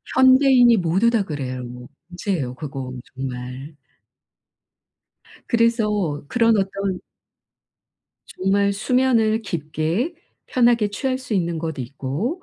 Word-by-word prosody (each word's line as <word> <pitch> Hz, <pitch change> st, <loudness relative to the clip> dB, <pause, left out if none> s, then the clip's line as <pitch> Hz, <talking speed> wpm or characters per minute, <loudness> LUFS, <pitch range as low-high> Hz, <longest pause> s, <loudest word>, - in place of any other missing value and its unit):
현대인이 260 Hz, -2 st, +6 dB
모두 185 Hz, +5 st, +2 dB
다 230 Hz, -3 st, +1 dB
그래요. 130 Hz, -7 st, -5 dB, 0.5 s
문제에요, 175 Hz, -8 st, -3 dB
그거 135 Hz, -2 st, -6 dB, 0.2 s
정말. 130 Hz, +2 st, -6 dB, 1.7 s
그래서 210 Hz, -, +1 dB
그런 230 Hz, +1 st, +3 dB
어떤 195 Hz, -1 st, -2 dB, 1.3 s
정말 200 Hz, +2 st, +1 dB
수면을 225 Hz, 0 st, +2 dB
깊게 165 Hz, -, -2 dB, 0.3 s
편하게 235 Hz, -4 st, +3 dB
취할 255 Hz, +5 st, -2 dB
수 255 Hz, -3 st, -6 dB
있는 170 Hz, -4 st, 0 dB
것 160 Hz, -1 st, -4 dB
있고 140 Hz, -, -4 dB
195 Hz, 210 characters per minute, -22 LUFS, 150-235 Hz, 1.7 s, 현대인이